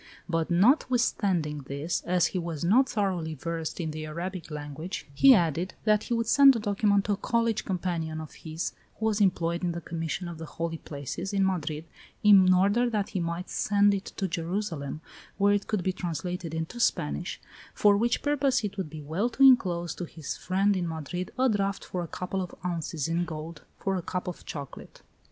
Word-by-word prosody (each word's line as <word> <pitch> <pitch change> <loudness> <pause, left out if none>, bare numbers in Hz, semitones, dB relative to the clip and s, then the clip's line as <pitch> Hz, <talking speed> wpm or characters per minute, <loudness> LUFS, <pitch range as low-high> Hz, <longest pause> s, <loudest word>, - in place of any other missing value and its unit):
But 165 -2 0
notwithstanding 195 - +2
this, 140 +5 -2
as 180 -1 +3
he 185 - 0
was 165 -3 -4
not 245 +9 +4
thoroughly 180 -7 -1
versed 165 +3 -4
in 160 -2 -2
the 155 0 -5
Arabic 170 +2 -5
language, 150 +4 -6
he 265 - +8
added 170 0 0
that 215 -1 +3
he 240 - 0
would 230 0 0
send 275 +2 +7
the - - 0
document 205 -1 +2
to 210 - 0
a - - +3
college 230 0 0
companion 170 -4 -2
of 155 -1 -8
his 160 +1 -4 0.3
who 220 - -2
was 215 -1 +1
employed 170 -3 +1
in 175 -1 0
the 170 - -4
Commission 165 +2 -4
of 170 -2 -7
the 160 - -6
Holy 165 -1 -2
Places, 150 +7 -5
in 195 -1 +3
Madrid, 160 -4 -2 0.4
in 195 -3 +7
order 200 +7 +3
that 210 -3 -1
he 195 - -2
might 170 +2 -3
send 205 0 +3
it 200 0 -3
to 195 - 0
Jerusalem, 165 -3 -3 0.4
where 205 0 +4
it 205 -1 -1
could 210 -5 -1
be 185 - 0
translated 175 -1 -4
into 160 +9 -4
Spanish, 75 - 0 0.4
for 205 -1 +5
which 235 +4 +1
purpose 280 -4 +2
it 200 -1 -4
would 185 -5 -3
be 155 0 -8
well 170 +11 -1
to 250 +3 +1
inclose 180 - +5
to 175 - -5
his 160 -3 -6
friend 195 +2 +1
in 180 -2 -1
Madrid 165 +3 -4
a 260 +1 +4
draft 200 -4 0
for 180 - -3
a 170 - -4
couple 185 +3 -3
of 180 - -6
ounces 165 -3 -2
in 170 +1 0
gold, 160 -1 -7 0.2
for 195 -1 -1
a 185 - -1
cup 180 +2 -4
of 180 - -7
chocolate. 140 -4 -8
180 Hz, 195 wpm, -28 LUFS, 165-205 Hz, 0.4 s, he